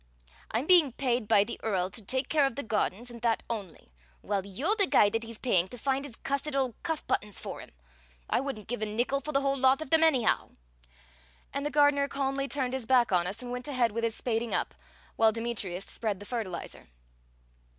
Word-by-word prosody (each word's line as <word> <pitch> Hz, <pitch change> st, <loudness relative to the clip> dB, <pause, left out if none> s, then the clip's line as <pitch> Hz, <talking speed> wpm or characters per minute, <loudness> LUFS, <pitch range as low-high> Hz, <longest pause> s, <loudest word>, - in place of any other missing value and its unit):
I'm 230 Hz, +5 st, -1 dB
being 330 Hz, -7 st, +6 dB
paid 245 Hz, -4 st, 0 dB
by 205 Hz, -2 st, +5 dB
the 235 Hz, -, -6 dB
Earl 190 Hz, -4 st, -1 dB
to 185 Hz, -, -3 dB
take 260 Hz, +6 st, -1 dB
care 295 Hz, -3 st, +3 dB
of 270 Hz, -, -6 dB
the 280 Hz, -, -4 dB
gardens, 220 Hz, +2 st, -1 dB
and 235 Hz, -1 st, -10 dB
that 230 Hz, -1 st, +1 dB
only; 200 Hz, -, -6 dB, 0.3 s
while 200 Hz, -2 st, -1 dB
you're 260 Hz, -, -1 dB
the 400 Hz, -3 st, +3 dB
guy 205 Hz, -9 st, +5 dB
that 225 Hz, -, -1 dB
he's 230 Hz, -1 st, -7 dB
paying 185 Hz, -9 st, +2 dB
to 245 Hz, -, -9 dB
find 270 Hz, +2 st, -1 dB
his 260 Hz, -5 st, -7 dB
cussed 280 Hz, +3 st, -2 dB
old 260 Hz, -3 st, +1 dB
cuff 325 Hz, -3 st, -3 dB
buttons 210 Hz, -2 st, -1 dB
for -, -, -6 dB
him. -, -, -11 dB, 0.6 s
I -, -, +1 dB
wouldn't 265 Hz, -6 st, -5 dB
give 245 Hz, -1 st, -4 dB
a 215 Hz, -, 0 dB
nickel 240 Hz, +6 st, 0 dB
for 300 Hz, -, -4 dB
the 275 Hz, -1 st, +2 dB
whole 275 Hz, 0 st, +1 dB
lot 265 Hz, +1 st, +4 dB
of 315 Hz, -4 st, -7 dB
them, 320 Hz, 0 st, +5 dB
anyhow!" 270 Hz, -8 st, +2 dB, 1.0 s
And 280 Hz, -, -2 dB
the 295 Hz, -, -1 dB
gardener 290 Hz, -1 st, +4 dB
calmly 275 Hz, 0 st, -1 dB
turned 265 Hz, -3 st, -1 dB
his 260 Hz, -4 st, -3 dB
back 250 Hz, -4 st, +4 dB
on 180 Hz, -1 st, +2 dB
us, 200 Hz, +7 st, -4 dB
and 245 Hz, -, -6 dB
went 250 Hz, +2 st, -4 dB
ahead 250 Hz, -5 st, +1 dB
with 230 Hz, +2 st, -3 dB
his 230 Hz, -1 st, 0 dB
spading 230 Hz, -1 st, -1 dB
up, -, -, -1 dB, 0.4 s
while 225 Hz, -1 st, +5 dB
Demetrius 210 Hz, -5 st, -3 dB
spread 210 Hz, -4 st, -2 dB
the 205 Hz, -, -9 dB
fertilizer. 210 Hz, -7 st, -5 dB
245 Hz, 215 wpm, -29 LUFS, 215-275 Hz, 1.0 s, being